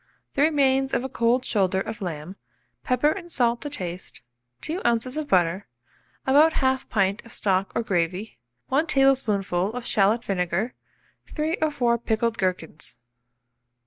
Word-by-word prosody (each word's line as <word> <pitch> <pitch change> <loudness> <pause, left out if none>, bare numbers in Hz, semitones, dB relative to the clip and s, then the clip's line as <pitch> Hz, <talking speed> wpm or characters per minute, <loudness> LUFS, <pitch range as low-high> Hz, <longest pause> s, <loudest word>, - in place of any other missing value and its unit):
The 280 - 0
remains 270 -3 +3
of - - 0
a 265 - -4
cold 240 +1 +1
shoulder 190 -3 +1
of 220 +3 -5
lamb, 170 0 -5 0.5
pepper 275 +4 +2
and 345 -1 -7
salt 240 -4 +1
to 290 - -4
taste, 180 - -6 0.4
2 335 +4 -4
oz. 240 +2 0
of 310 -1 -3
butter, 185 -2 +1 0.6
about 295 +4 +5
1/2 260 -1 0
pint 200 -2 0
of 235 - -15
stock 195 -1 0
or 235 - 0
gravy, 185 - -2 0.3
1 300 +5 +2
tablespoonful 215 -9 +2
of 250 -1 -5
shalot 215 +3 +2
vinegar, 190 +4 -1 0.6
3 315 +2 0
or 315 - +3
4 240 -5 +1
pickled 230 0 -1
gherkins. 180 -4 -3
235 Hz, 145 wpm, -25 LUFS, 190-270 Hz, 0.6 s, about